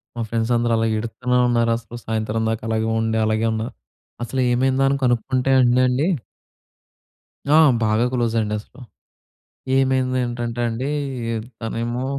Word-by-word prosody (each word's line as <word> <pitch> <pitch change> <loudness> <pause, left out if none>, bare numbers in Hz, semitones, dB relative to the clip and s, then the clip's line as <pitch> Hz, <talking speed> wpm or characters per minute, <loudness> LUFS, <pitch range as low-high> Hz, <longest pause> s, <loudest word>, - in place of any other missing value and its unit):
మా 120 - -3
ఫ్రెండ్స్ 115 +1 -1
అందరూ 120 0 +1
అలా 115 0 +1
ఏడుత్తునే 125 +3 -1
ఉన్నారసలు 115 0 0
సాయంత్రం 110 0 -1
దాకా. 110 0 -3
అలాగే 110 0 0
ఉండి 110 0 0
అలాగే 110 +1 +1
ఉన్నారు. 110 +1 -4 0.5
అసలేమైందా 130 +2 +1
అని 140 - +1
కనుక్కుంటే 125 +2 +1
అండండి 125 +4 +3 1.4
ఆ! 150 +2 +5 0.3
బాగా 110 +2 +2
క్లోజండసలు. 115 -1 -2 0.9
ఏమైందనంటే 130 -3 0
అండి 125 +5 -3 0.7
తనేమో 120 +3 -3
120 Hz, 110 wpm, -21 LUFS, 115-125 Hz, 1.4 s, ఆ